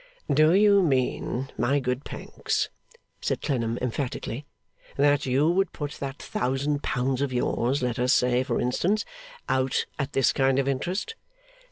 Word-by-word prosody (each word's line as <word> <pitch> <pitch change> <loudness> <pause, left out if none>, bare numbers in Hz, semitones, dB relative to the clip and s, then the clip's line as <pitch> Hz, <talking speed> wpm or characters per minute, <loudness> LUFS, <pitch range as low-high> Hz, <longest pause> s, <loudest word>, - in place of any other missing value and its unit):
'Do 155 +3 +5
you 200 0 +6
mean, 130 -3 0
my 130 +5 +2
good 125 +1 -2
Pancks,' - - -3 0.5
asked - - -2
Clennam 115 -5 -1
emphatically, 125 +1 -3 0.5
'that 145 0 +3
you 135 +4 +3
would 195 +2 +1
put 145 -2 -4
that 135 0 -5
thousand 140 +3 -1
pounds 130 +1 -1
of 140 -2 0
yours, 125 +1 0
let 125 -1 -1
us 125 +1 +2
say, 125 0 +3
for 130 - -1
instance, 190 - +1 0.4
out 130 0 +1
at 140 0 -2
this 135 - +3
kind 135 -1 +2
of 135 0 +1
interest? 180 - -2
135 Hz, 150 wpm, -26 LUFS, 125-145 Hz, 0.5 s, you